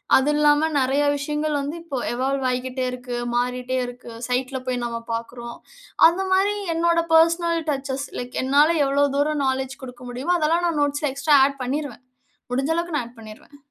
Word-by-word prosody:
அது 265 Hz, +2 st, +3 dB
இல்லாம, 295 Hz, +1 st, +4 dB
நெறைய 270 Hz, +2 st, +2 dB
விஷயங்கள் 300 Hz, +1 st, -2 dB
வந்து 285 Hz, +3 st, -4 dB
இப்போ 285 Hz, -6 st, -5 dB
எவால்வ் 265 Hz, +2 st, -1 dB
ஆயிகிட்டே 255 Hz, +1 st, -2 dB
இருக்கு. 250 Hz, -1 st, -6 dB, 0.2 s
மாறிட்டே 250 Hz, +1 st, -1 dB
இருக்கு. 245 Hz, -1 st, -9 dB, 0.2 s
சைட்ல 255 Hz, +1 st, -1 dB
போய் 250 Hz, -1 st, -1 dB
நம்ம 235 Hz, -1 st, -3 dB
பார்க்குறோம். 235 Hz, +1 st, -6 dB, 0.5 s
அந்த 360 Hz, +3 st, 0 dB
மாரி 395 Hz, +2 st, +3 dB, 0.2 s
என்னோட 335 Hz, 0 st, +2 dB
பெர்சனல் 335 Hz, +1 st, +4 dB
டச்சஸ், 275 Hz, 0 st, -2 dB
லைக் 245 Hz, 0 st, -5 dB
என்னால 285 Hz, +4 st, +4 dB, 0.2 s
எவ்வளவு 280 Hz, 0 st, +2 dB
தூரம் 295 Hz, 0 st, +1 dB
நாலெட்ஜ் 265 Hz, 0 st, -2 dB
குடுக்க 250 Hz, -1 st, -10 dB
முடியுமோ, 275 Hz, +9 st, 0 dB
அதெல்லாம் 335 Hz, +3 st, +2 dB
நான் 325 Hz, -3 st, -1 dB
நோட்ஸ்ல 290 Hz, 0 st, -1 dB
எக்ஸ்ட்ரா 285 Hz, +1 st, +4 dB
ஆட் 275 Hz, -2 st, -7 dB
பண்ணீருவேன். 270 Hz, -2 st, -4 dB, 0.5 s
முடிஞ்ச 270 Hz, +5 st, 0 dB
அளவுக்கு 340 Hz, -2 st, -2 dB
நான் -, -, -2 dB
ஆட் 235 Hz, -, -21 dB
பண்ணீருவேன். 220 Hz, +6 st, -13 dB
275 Hz, 165 wpm, -23 LUFS, 250-305 Hz, 0.5 s, இல்லாம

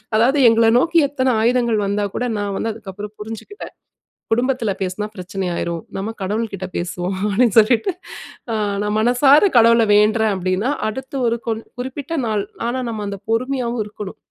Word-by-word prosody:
அதாவது 250 Hz, +6 st, +3 dB
எங்கள 225 Hz, 0 st, +4 dB
நோக்கி 335 Hz, +5 st, +1 dB
எத்தனை 260 Hz, -2 st, 0 dB
ஆயுதங்கள் 235 Hz, -1 st, +2 dB
வந்தாகூட, 205 Hz, +3 st, -2 dB
நான் 205 Hz, -1 st, -2 dB
வந்து 225 Hz, -, -2 dB
அதுக்கப்புறம் 205 Hz, -1 st, -9 dB
புரிஞ்சுக்கிட்டேன். 225 Hz, -, -8 dB, 0.6 s
குடும்பத்துல 240 Hz, -2 st, +1 dB
பேசுனா, 190 Hz, +3 st, -2 dB
பிரச்சனை 185 Hz, +1 st, -4 dB
ஆயிரும். 170 Hz, -1 st, -3 dB
நம்ப 195 Hz, +3 st, -3 dB
கடவுள்கிட்ட 200 Hz, -1 st, -3 dB
பேசுவோம். 180 Hz, +1 st, -3 dB
அப்பிடீன்னு, 220 Hz, +2 st, +2 dB
சொல்லிட்டு 225 Hz, -, +2 dB, 0.6 s
அ -, -, 0 dB, 0.3 s
நான் 210 Hz, 0 st, -1 dB
மனசார 270 Hz, -, +5 dB
கடவுள 230 Hz, 0 st, +6 dB
வேண்ட்றேன். 215 Hz, +1 st, +3 dB
அப்பிடீன்னா 185 Hz, +6 st, -1 dB, 0.2 s
அடுத்து 265 Hz, +5 st, -6 dB
ஒரு 230 Hz, -, +1 dB
கொன் 225 Hz, 0 st, -2 dB, 0.2 s
குறிப்பிட்ட 270 Hz, +5 st, -4 dB
நாள், 210 Hz, -2 st, 0 dB, 0.2 s
ஆனா 250 Hz, +2 st, -2 dB
நம்ப 220 Hz, -2 st, -4 dB
அந்த 200 Hz, 0 st, -5 dB
பொறுமையாவும் 245 Hz, 0 st, -1 dB
இருக்கணும் 210 Hz, 0 st, -8 dB
220 Hz, 145 wpm, -20 LUFS, 205-245 Hz, 0.6 s, கடவுள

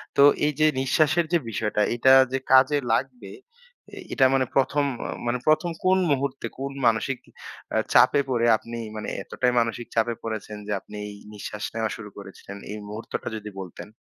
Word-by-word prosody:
তো -, -, +4 dB, 0.2 s
এই 150 Hz, -, +1 dB
যে 155 Hz, -, +5 dB
নিঃশ্বাসের 155 Hz, +5 st, +2 dB
যে 170 Hz, -, +6 dB
বিষয়টা, 105 Hz, -1 st, -1 dB
এটা 130 Hz, +2 st, +5 dB, 0.2 s
যে 135 Hz, -, 0 dB
কাজে 130 Hz, +3 st, +6 dB, 0.2 s
লাগবে 120 Hz, -5 st, -2 dB, 0.6 s
এ -, -, -13 dB, 0.2 s
এটা 135 Hz, -, +4 dB
মানে 130 Hz, -1 st, +2 dB
প্রথম 140 Hz, +2 st, +2 dB, 0.4 s
মানে, 120 Hz, +1 st, +1 dB
প্রথম 155 Hz, +3 st, +3 dB
কোন 185 Hz, +1 st, +4 dB
মুহূর্তে 140 Hz, -1 st, -1 dB
কোন 140 Hz, 0 st, -3 dB, 0.2 s
মানসিক 115 Hz, +4 st, +1 dB, 0.6 s
আ -, -, +3 dB, 0.2 s
চাপে 140 Hz, -, +6 dB
পড়ে 120 Hz, -2 st, +1 dB
আপনি 115 Hz, +2 st, -8 dB, 0.2 s
মানে 110 Hz, -, -5 dB
এতটাই 125 Hz, -1 st, 0 dB
মানসিক 115 Hz, 0 st, -1 dB
চাপে 115 Hz, +1 st, +2 dB
পড়েছেন 110 Hz, -1 st, -5 dB
যে, -, -, -4 dB
আপনি 105 Hz, -, -13 dB
এই 105 Hz, -, -8 dB, 0.2 s
নিঃশ্বাস 105 Hz, 0 st, -7 dB
নেওয়া 110 Hz, -1 st, -1 dB
শুরু 105 Hz, -2 st, -9 dB
করেছিলেন? 100 Hz, 0 st, -10 dB
এই 105 Hz, -, -5 dB
মুহূর্তটা 110 Hz, +2 st, -6 dB
যদি 105 Hz, -1 st, -6 dB
বলতেন। 90 Hz, 0 st, -8 dB
120 Hz, 170 wpm, -25 LUFS, 105-135 Hz, 0.6 s, যে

